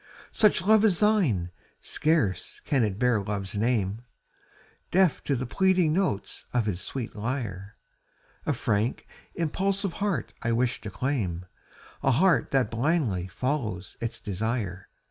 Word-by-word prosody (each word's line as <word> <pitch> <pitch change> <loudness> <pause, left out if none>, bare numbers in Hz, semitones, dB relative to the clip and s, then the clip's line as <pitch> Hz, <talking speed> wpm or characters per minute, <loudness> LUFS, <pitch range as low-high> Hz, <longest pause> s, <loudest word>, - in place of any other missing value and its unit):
Such 210 -5 +3
love 215 +2 +5
as 200 -6 +3
thine, 155 - +2 0.3
scarce 150 - 0
can 135 -5 +2
it 100 -3 -1
bear 120 -2 +2
love's 100 -1 -4
name, 110 -1 0 0.9
Deaf 185 -5 +3
to 140 - +1
the 130 +1 -2
pleading 185 +2 +3
notes 165 - -1
of 120 -3 +2
his 95 -4 -2
sweet 120 +3 -5
lyre, 110 -4 -4 0.7
A - - +3
frank, 110 +4 -1 0.3
impulsive 190 +3 0
heart 200 - -1
I 115 - 0
wish 125 +1 0
to 105 - -5
claim, 100 -6 -2 0.6
A - - +2
heart 150 +1 +3
that 130 -5 +1
blindly 115 - 0
follows 110 - -3
its 115 - -3
desire. 100 -2 -3
120 Hz, 135 wpm, -27 LUFS, 105-165 Hz, 0.9 s, love